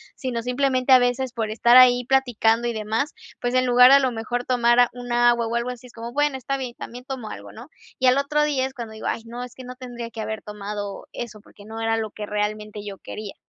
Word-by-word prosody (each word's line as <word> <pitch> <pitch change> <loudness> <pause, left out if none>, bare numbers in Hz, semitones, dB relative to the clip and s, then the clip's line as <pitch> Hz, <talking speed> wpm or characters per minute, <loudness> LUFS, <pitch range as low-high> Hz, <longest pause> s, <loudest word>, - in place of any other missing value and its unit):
sino 240 -4 -4
simplemente 255 +1 +2
a 255 - +9
veces 245 +1 0
por 225 -3 -2
estar 235 +3 +4
ahí 250 -1 +7
platicando 240 -3 +2
y 235 - -1
demás, 220 +7 -2 0.3
pues 245 +1 -1
en 255 0 +3
lugar 250 +1 +7
a 275 - +9
lo 260 -2 +1
mejor 240 +2 -3
tomar 240 -1 +3
a 245 - +5
un 245 -1 -8
agua, 240 -1 +3
o 230 - -3
algo 240 +1 -1
así, 250 0 -10
es - - -18
como, 230 +1 -7
bueno: 290 -2 +1
"Está 270 +2 -3
bien, 250 -3 -6
también 245 +1 -9
tomo 255 -5 -6
algo", - - -9
¿no? 240 +7 -12 0.3
Y 260 - +1
al 255 - +5
otro 300 +2 +1
día 275 -3 +1
es 265 - -13
cuando 230 -3 -7
digo: 220 - -6
"Ay, 225 - -2
no, 240 +2 -7
es 250 - -10
que 260 - -10
no 250 0 -8
tendría 240 -2 -8
que 220 - -6
haber 215 0 -5
tomado 205 -1 -6
eso", 220 -3 -7
porque 205 0 -17
no 225 +1 -7
era 225 0 +1
lo 220 -2 -3
que 210 -1 -7
realmente 210 0 -3
yo 200 -2 -7
quería. 210 -2 -8
240 Hz, 255 wpm, -23 LUFS, 225-255 Hz, 0.3 s, a